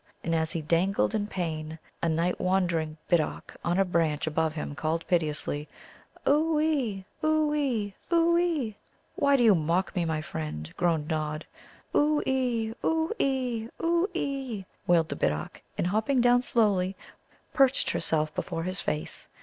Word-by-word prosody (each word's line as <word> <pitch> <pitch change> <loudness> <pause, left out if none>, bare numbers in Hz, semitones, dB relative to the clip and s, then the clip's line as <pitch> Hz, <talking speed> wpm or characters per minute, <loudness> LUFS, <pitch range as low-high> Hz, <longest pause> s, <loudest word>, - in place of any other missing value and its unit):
And 165 - -1
as 160 -1 +1
he 165 - -3
dangled 175 +8 +2
in 210 -2 0
pain, 160 -5 -4 0.2
a 165 - +1
night 165 +3 0
wandering 170 -4 +1
Bittock 165 -4 0
on 175 +1 +1
a 195 - +4
branch 165 -4 +1
above 160 0 0
him 150 -2 -4
called 160 +2 -2
piteously: 150 -3 0 0.6
"Oo 305 +2 +3
ee, 260 -12 0 0.2
oo 310 -1 +2
ee, 240 -9 0 0.2
oo 340 0 +4
ee!" 320 -11 +1 0.4
"Why 280 0 +4
do 245 - +3
you 220 -3 +7
mock 170 +3 0
me, 180 - +1
my 160 -1 -1
friend?" 75 - -5
groaned 165 -4 +1
Nod. 155 0 -2 0.5
"Oo 300 0 +4
ee, 245 -4 0
oo 320 0 +1
ee, 250 -4 0
oo 340 +2 +2
ee!" 265 - -3 0.2
wailed 170 -2 +4
the - - -3
Bittock, 75 0 -2 0.2
and - - 0
hopping 220 +8 +1
down 245 0 +5
slowly, 200 -6 +2 0.6
perched 270 -2 +3
herself 155 -2 0
before 165 - -3
his 185 +2 -2
face. 150 - -4
190 Hz, 155 wpm, -28 LUFS, 160-260 Hz, 0.6 s, you